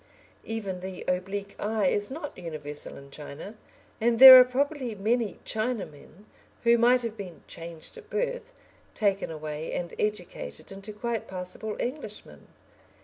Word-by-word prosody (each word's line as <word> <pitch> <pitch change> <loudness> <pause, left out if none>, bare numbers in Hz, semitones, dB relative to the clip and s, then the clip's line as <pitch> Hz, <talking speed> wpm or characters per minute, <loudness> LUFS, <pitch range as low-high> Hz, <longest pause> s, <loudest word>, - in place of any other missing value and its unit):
Even 205 -5 -4
the 185 0 -7
oblique 195 +2 -2
eye 215 -1 0
is 205 +2 +2
not 290 +2 -6
universal 155 -4 -7
in 140 0 -13
China, 150 +7 -8 0.5
and 230 +1 +3
there 260 +1 +13
are - - +10
probably 255 -1 -1
many 220 +2 0
Chinamen 215 - -4 0.4
who 235 0 +5
might 245 +1 +5
have 230 -2 -3
been 190 -6 -9
"changed 165 -1 -9
at 435 -2 -17
birth," - - -2 0.4
taken 200 -2 +1
away 155 0 -5
and 175 -1 -4
educated 210 -3 -3
into 195 +2 -7
quite 230 +2 -3
passable 185 +3 -6
Englishmen. 245 -5 -6
210 Hz, 140 wpm, -27 LUFS, 180-240 Hz, 0.5 s, there